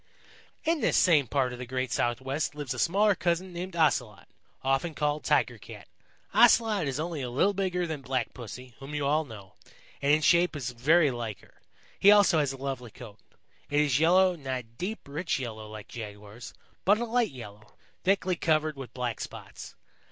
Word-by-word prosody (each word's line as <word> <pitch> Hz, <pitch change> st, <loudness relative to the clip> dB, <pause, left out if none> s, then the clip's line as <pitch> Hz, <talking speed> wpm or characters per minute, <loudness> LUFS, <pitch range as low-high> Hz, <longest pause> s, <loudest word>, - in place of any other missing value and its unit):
"In 325 Hz, -1 st, +1 dB
this -, -, +2 dB
same 155 Hz, -7 st, +4 dB
part 130 Hz, -2 st, 0 dB
of 125 Hz, -, -8 dB
the 125 Hz, -, -5 dB
great 130 Hz, 0 st, -2 dB
Southwest 135 Hz, +5 st, -1 dB
lives 145 Hz, -4 st, -4 dB
a -, -, -6 dB
smaller 205 Hz, +4 st, +3 dB
cousin 180 Hz, 0 st, -1 dB
named 175 Hz, +1 st, -6 dB
Ocelot, 125 Hz, -, +1 dB, 0.4 s
often 135 Hz, +5 st, 0 dB
called 150 Hz, 0 st, -1 dB
Tiger -, -, +1 dB
Cat. -, -, -12 dB, 0.5 s
Ocelot 215 Hz, -8 st, +5 dB
is 135 Hz, +1 st, -2 dB
only 160 Hz, -2 st, -3 dB
a 125 Hz, -, -3 dB
little 145 Hz, +12 st, +2 dB
bigger 180 Hz, -2 st, -1 dB
than 160 Hz, -4 st, -5 dB
Black 130 Hz, -1 st, -2 dB
Pussy, 125 Hz, +1 st, -9 dB
whom 140 Hz, +2 st, -7 dB
you 145 Hz, -1 st, -1 dB
all 155 Hz, +3 st, +2 dB
know, 105 Hz, -7 st, -12 dB, 0.5 s
and 140 Hz, -, +2 dB
in 155 Hz, +1 st, +4 dB
shape 175 Hz, 0 st, +4 dB
is 130 Hz, -4 st, -4 dB
very 145 Hz, +5 st, +3 dB
like 115 Hz, -4 st, -5 dB
her. -, -, -23 dB, 0.4 s
He 200 Hz, -, +6 dB
also 200 Hz, -5 st, +6 dB
has 145 Hz, -3 st, +1 dB
a 135 Hz, -, -7 dB
lovely 135 Hz, -3 st, -5 dB
coat. 110 Hz, -2 st, -12 dB, 0.5 s
It 145 Hz, -, +2 dB
is 145 Hz, -3 st, +2 dB
yellow, 180 Hz, +3 st, +4 dB
not 135 Hz, -5 st, -4 dB
a -, -, -19 dB
deep, 175 Hz, -, -6 dB
rich 160 Hz, +5 st, -2 dB
yellow 110 Hz, -4 st, -6 dB
like 110 Hz, -1 st, -9 dB
Jaguar's, 105 Hz, 0 st, -9 dB, 0.3 s
but 205 Hz, +2 st, +4 dB
a 240 Hz, -, -2 dB
light 240 Hz, 0 st, +1 dB
yellow, 105 Hz, -5 st, -12 dB, 0.3 s
thickly 185 Hz, -1 st, +2 dB
covered 155 Hz, -2 st, +1 dB
with 135 Hz, -4 st, -9 dB
black 125 Hz, -2 st, -3 dB
spots. -, -, -9 dB
145 Hz, 190 wpm, -28 LUFS, 125-175 Hz, 0.5 s, He